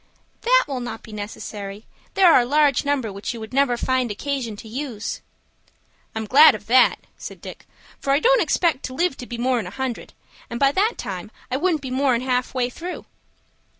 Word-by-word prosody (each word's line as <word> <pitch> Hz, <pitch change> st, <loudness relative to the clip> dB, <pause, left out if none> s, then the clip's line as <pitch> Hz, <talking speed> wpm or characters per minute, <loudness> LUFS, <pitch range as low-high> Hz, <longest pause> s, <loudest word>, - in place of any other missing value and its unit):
"That -, -, +4 dB
will 270 Hz, -3 st, -3 dB
not 240 Hz, -2 st, -6 dB
be 220 Hz, -, -12 dB
necessary. 205 Hz, 0 st, -7 dB, 0.3 s
There 365 Hz, -4 st, +6 dB
are -, -, +7 dB
a 240 Hz, -, +1 dB
large 290 Hz, 0 st, +3 dB
number 275 Hz, -7 st, -1 dB
which 200 Hz, +5 st, -5 dB
you -, -, -7 dB
would 220 Hz, +2 st, -9 dB
never 265 Hz, -3 st, +2 dB
find 255 Hz, 0 st, 0 dB
occasion 240 Hz, +1 st, -3 dB
to 220 Hz, +2 st, -11 dB
use." 235 Hz, -2 st, -5 dB, 0.9 s
"I'm 220 Hz, 0 st, -3 dB
glad 280 Hz, +4 st, +7 dB
of 210 Hz, -, -10 dB
that," 250 Hz, +3 st, +4 dB, 0.2 s
said -, -, -8 dB
Dick; -, -, -11 dB, 0.3 s
"for 275 Hz, -, -1 dB
I 280 Hz, -, +4 dB
don't -, -, +4 dB
expect 330 Hz, -6 st, +1 dB
to 255 Hz, -, -6 dB
live 345 Hz, -1 st, +1 dB
to 245 Hz, -, -8 dB
be 240 Hz, -, -6 dB
more'n 240 Hz, -4 st, 0 dB
a -, -, -5 dB
hundred, 260 Hz, +3 st, -5 dB, 0.4 s
and 235 Hz, 0 st, -5 dB
by 275 Hz, 0 st, +4 dB
that 415 Hz, +9 st, +1 dB
time 195 Hz, -2 st, -6 dB, 0.2 s
I 255 Hz, -, +1 dB
wouldn't 325 Hz, -1 st, 0 dB
be 260 Hz, -, -5 dB
more'n 260 Hz, -2 st, +2 dB
half 250 Hz, -1 st, 0 dB, 0.2 s
through." 350 Hz, +7 st, -7 dB
255 Hz, 195 wpm, -22 LUFS, 225-285 Hz, 0.9 s, are